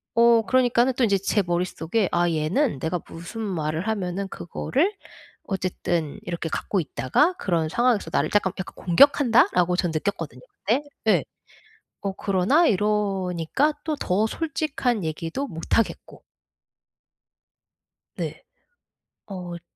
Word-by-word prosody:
어 235 -1 +5
그러니까는 245 +2 +3
또 250 - 0
인제 200 -3 +3
제 200 +2 +1
머릿속에 175 +3 -1
'아 175 0 +2
얘는 165 - 0
내가 165 +4 -1
무슨 170 +8 -8
말을 165 -2 -2
하면은 195 -2 -2
그거를 280 - -1 0.5
어쨌든 175 -5 -2
이렇게 170 -2 -4
갖고 195 - -1
있다가 155 - +1
그런 165 -4 0
상황에서 240 +4 +1
나를 - - +1
쪼금 205 -2 +2
약간 190 - -6
공격한다.'라고 220 - +5
저는 180 -2 0
느꼈거든요 155 - -3 0.2
그때 240 +8 +2 0.2
예. - - +4 0.8
어 195 -1 -2
그러나 200 - +2
이러니까 200 - +1
또 310 -2 -1
더 200 -3 +1
솔직한 275 - -1
얘기도 165 - -3
못 165 -1 -1
하겠고. 230 - -2 1.9
네. - - -5 0.8
어 180 -3 -7
츠 170 - -16
195 Hz, 275 characters per minute, -24 LUFS, 170-235 Hz, 1.9 s, 어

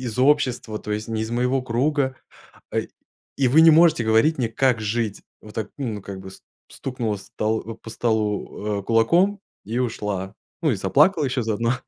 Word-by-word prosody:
из 115 0 -5
общества, 130 -5 +2
то - - -7
есть 105 +2 -3
не 110 -1 -2
из 110 - -4
моего 125 +2 +1
круга, 130 +2 0 0.6
а, - - 0 0.6
и 135 -3 +2
вы 155 +6 +6
не 165 - +9
можете 160 -5 +5
говорить 110 +9 +3
мне, 120 -3 0
как 125 0 +1
жить". 110 -1 -2 0.2
Вот 105 - -13
так, 110 -2 -4
ну, 110 -7 -4
как 100 -1 -7
бы, 95 - -9
с - - -15 0.3
стукнула 120 -5 -3
с 100 - -12
стол 110 +1 -2
по 115 - -11
столу, 105 -2 -1
а, - - -10
кулаком 170 - +3 0.3
и 115 +4 -3
ушла, 105 -5 -3 0.3
ну, 150 -5 +3
и - - -1
заплакала 150 - +3
еще 125 -1 -1
заодно. 115 +2 0
115 Hz, 185 wpm, -23 LUFS, 110-135 Hz, 0.6 s, не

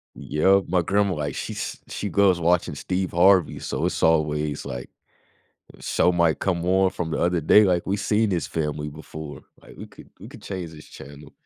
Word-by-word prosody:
Yep, 95 +6 +2
my 90 -1 +1
grandma, 100 +1 +1
like, 75 -1 -4
she's - - -5
she 105 - -5
goes 95 -1 +3
watching 85 -2 +1
Steve 95 +5 -3
Harvey, 90 0 +4
so - - -3
it's - - -3
always 75 -2 +1
like 60 -1 -7 0.9
show 90 - +1
might 85 -2 +1
come 85 -3 -1
on 95 +1 +3
from 80 -2 -5
the - - -2
other 85 0 +1
day, 105 +7 +6
like, 90 -3 +1
"We 100 +2 0
seen 105 +2 +1
this 85 -6 -1
family 75 -2 -3
before, 75 0 -9 0.2
like, - - -16
we - - -8
could - - -16
we - - -10
could - - -14
change 90 -4 -6
this 75 -1 -13
channel." 70 +1 -13
85 Hz, 190 wpm, -23 LUFS, 75-95 Hz, 0.9 s, day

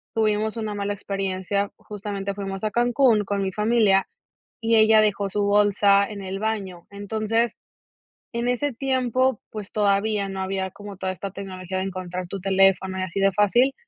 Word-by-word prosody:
tuvimos 215 0 +1
una 215 -2 -3
mala 200 0 -2
experiencia, 195 0 -2
justamente 200 -1 -5
fuimos 195 -1 -5
a 215 - 0
Cancún 240 -1 +3
con 200 0 -1
mi 190 - -1
familia, 210 -2 +3 0.5
y 225 0 +2
ella 220 0 +6
dejó 205 -1 +1
su 205 +2 -1
bolsa 200 0 +4
en 205 -2 -7
el 190 +1 -4
baño. 200 -5 -3
Entonces, 215 +3 -1 0.8
en 235 +1 -1
ese 280 +4 0
tiempo, 260 -1 0
pues, 210 -2 -7
todavía 205 0 +1
no 195 0 -5
había 190 0 -2
como 205 +1 -10
toda 190 0 -2
esta 195 +2 -6
tecnología 185 -1 -6
de - - -1
encontrar 185 -1 -5
tu 195 +2 -5
teléfono 190 0 +2
y - - -1
así 185 +1 -3
de 195 0 +4
fácil, 240 +7 +3
200 Hz, 170 wpm, -24 LUFS, 195-220 Hz, 0.8 s, ella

